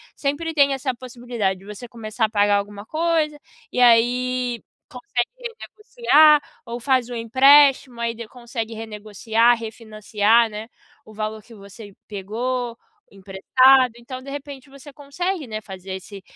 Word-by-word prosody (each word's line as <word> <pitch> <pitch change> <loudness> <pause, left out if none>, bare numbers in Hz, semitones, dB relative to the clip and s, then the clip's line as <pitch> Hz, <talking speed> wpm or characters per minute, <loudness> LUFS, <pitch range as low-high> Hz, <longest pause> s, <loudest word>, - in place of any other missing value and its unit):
sempre 295 +4 -3
tem 280 -2 +3
essa 270 -1 -2
possibilidade 240 -6 -4
de 195 - -17
você 210 +4 -9
começar 225 -1 -3
a - - -4
pagar 205 -1 +2
alguma 200 0 -6
coisa 315 0 -1 0.3
e - - -3
aí 245 +1 +2 0.3
consegue 245 -1 -3
renegociar, 425 -10 +3 0.2
ou 235 0 -6
faz 255 -1 +1
o 245 - -6
empréstimo, 265 +2 +4
aí 235 0 -1
d 230 -1 -9
consegue 235 -1 -6
renegociar, 220 +2 0
refinanciar, 220 0 0
né, 215 +1 -8 0.4
o 215 - -15
valor 215 0 -5
que 230 - -16
você 205 +1 -13 0.2
pegou 235 +4 -4 0.3
emprestado. 250 +7 +3
Então, 255 +2 -9
de 275 - -11
repente, 280 -1 -8
você 275 +1 -13
consegue, 300 +3 -4
né, 215 -1 -5
fazer 190 -2 -9
esse 195 +1 -9
235 Hz, 145 wpm, -22 LUFS, 215-270 Hz, 0.4 s, empréstimo